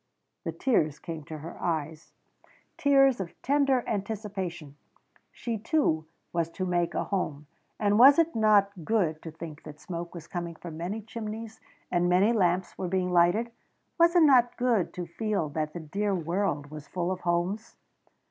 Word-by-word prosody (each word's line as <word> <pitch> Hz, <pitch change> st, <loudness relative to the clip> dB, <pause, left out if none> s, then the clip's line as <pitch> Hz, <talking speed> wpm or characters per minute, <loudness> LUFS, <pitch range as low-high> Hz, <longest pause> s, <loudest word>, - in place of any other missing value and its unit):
The -, -, -1 dB
tears 155 Hz, -, +1 dB
came 160 Hz, -1 st, -7 dB
to 155 Hz, -1 st, -7 dB
her 160 Hz, +3 st, -9 dB
eyes 160 Hz, -1 st, -3 dB, 0.6 s
tears 275 Hz, -3 st, +4 dB
of 180 Hz, -3 st, -6 dB
tender 275 Hz, -2 st, +2 dB
anticipation. 195 Hz, -7 st, -4 dB, 0.6 s
She 230 Hz, -3 st, -4 dB
too 200 Hz, -, +1 dB, 0.3 s
was 170 Hz, -1 st, 0 dB
to 185 Hz, -, -2 dB
make 175 Hz, -1 st, 0 dB
a -, -, 0 dB
home. 155 Hz, -7 st, -3 dB, 0.3 s
And 205 Hz, 0 st, +3 dB
was 275 Hz, +3 st, +9 dB
it 330 Hz, 0 st, +2 dB
not 210 Hz, -3 st, +4 dB
good 165 Hz, -7 st, 0 dB
to 165 Hz, -, -7 dB
think 160 Hz, -1 st, -9 dB
that 150 Hz, -1 st, -11 dB
smoke 170 Hz, +1 st, -6 dB
was 165 Hz, -3 st, -8 dB
coming 170 Hz, -1 st, -5 dB
from 165 Hz, -1 st, -9 dB
many 195 Hz, +6 st, -4 dB
chimneys 220 Hz, 0 st, -7 dB, 0.3 s
and 175 Hz, 0 st, +2 dB
many 190 Hz, +6 st, +4 dB
lamps 180 Hz, -4 st, +1 dB
were 185 Hz, -, -2 dB
being 180 Hz, 0 st, 0 dB
lighted? 180 Hz, +7 st, +3 dB, 0.5 s
Was 340 Hz, +1 st, +5 dB
it 345 Hz, -, +7 dB
not 255 Hz, -5 st, +5 dB
good 240 Hz, -7 st, +1 dB
to 180 Hz, -, -4 dB
feel 195 Hz, -1 st, -2 dB
that 155 Hz, +1 st, -3 dB
the 175 Hz, -, -5 dB
dear 195 Hz, +6 st, -1 dB
world 170 Hz, -4 st, -1 dB
was 150 Hz, -1 st, -9 dB
full 180 Hz, 0 st, -2 dB
of 185 Hz, -, -3 dB
homes? 175 Hz, +5 st, -1 dB
185 Hz, 165 wpm, -28 LUFS, 165-220 Hz, 0.6 s, was